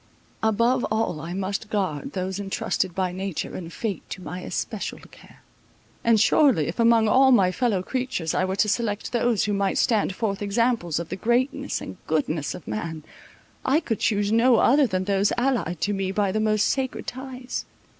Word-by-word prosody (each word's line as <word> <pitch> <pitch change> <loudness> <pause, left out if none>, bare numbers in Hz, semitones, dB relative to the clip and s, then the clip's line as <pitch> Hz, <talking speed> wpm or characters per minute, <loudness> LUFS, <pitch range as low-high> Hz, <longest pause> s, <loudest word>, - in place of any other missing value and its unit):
Above 230 +4 +2
all 215 -7 -1
I 165 +3 -5
must 200 +2 -3
guard 185 -9 -2
those 190 +1 -3
entrusted 190 -2 -2
by 185 -2 0
nature 190 -2 -4
and 170 -2 -7
fate 205 +1 -3
to - - -6
my 180 - -6
especial - - -4
care. - - -17 0.6
And 230 -2 +4
surely, 245 - +4
if 170 - -5
among 230 -1 +5
all 265 +4 +5
my 195 -7 +5
fellow 210 -4 0
creatures 250 - -2
I - - +1
were 190 0 -1
to 210 - +2
select 210 -1 -1
those 240 -2 +1
who 210 - 0
might 200 -1 0
stand 210 -5 +2
forth 200 -3 -2
examples 205 -4 0
of 170 -1 -4
the 185 - -3
greatness 255 +7 0
and 95 - -8
goodness 155 -1 -1
of 170 - -11
man, 155 +9 -4 0.6
I 275 +4 +3
could 225 - -3
choose 205 -1 +1
no 235 +2 +5
other 270 +5 +4
than 185 -3 -1
those 200 +1 +1
allied 245 -10 0
to 205 - +1
me 195 -1 -1
by 200 -1 +1
the 215 - 0
most 215 0 +2
sacred 265 -2 -2
ties. 260 -1 -6
205 Hz, 185 wpm, -24 LUFS, 185-235 Hz, 0.6 s, among